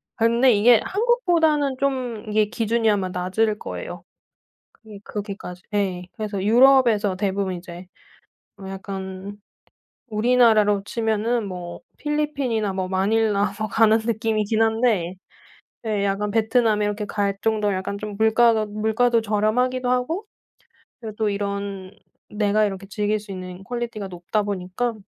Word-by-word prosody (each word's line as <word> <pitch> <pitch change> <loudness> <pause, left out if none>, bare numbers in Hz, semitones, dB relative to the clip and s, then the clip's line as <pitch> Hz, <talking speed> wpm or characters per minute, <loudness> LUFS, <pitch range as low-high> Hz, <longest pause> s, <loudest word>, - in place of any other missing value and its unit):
근데 235 +3 +4
이게 225 +3 +6
한국보다는 345 - +2
좀 255 -5 -2
이게 215 0 +3
기준이 225 +1 0
아마 195 -3 +1
낮을 190 +4 0
거예요. - - -7 0.7
그게 215 -2 -13
그렇게까지. 200 -3 -7
예 190 -3 -1
그래서 210 -3 -4
유럽에서 235 -4 +5
대부분 195 -1 -1
이제 175 0 -9 0.7
뭐 195 - -9
약간 195 0 -7 0.7
우리나라로 215 -3 +3
치면은 225 +1 -1
뭐 175 -2 -7 0.2
필리핀이나 280 -8 -1
뭐 190 -1 -2
마닐라 205 +1 +1
뭐 215 - -1
가는 220 +1 +4
느낌이긴 220 -1 0
한데 220 -6 +1 0.7
예 210 -2 0
약간 200 +1 -1
베트남에 220 -1 +2
이렇게 210 +1 -2
갈 200 -1 -1
정도로 215 -2 +1
약간 190 +2 -4
좀 210 -1 -6
물가가 220 0 +3
물가도 220 +3 +1
저렴하기도 230 +4 0
하고 255 - -1 0.8
그리고 220 -3 -7
또 220 -1 0
이런 200 -1 -4 0.4
내가 210 0 +2
이렇게 195 -1 -4
즐길 210 +1 -1
수 205 -1 -10
있는 185 0 -8
퀄리티가 235 -3 -4
높다 180 +4 -2
보니까 200 +4 -2
215 Hz, 305 characters per minute, -23 LUFS, 200-230 Hz, 0.8 s, 이게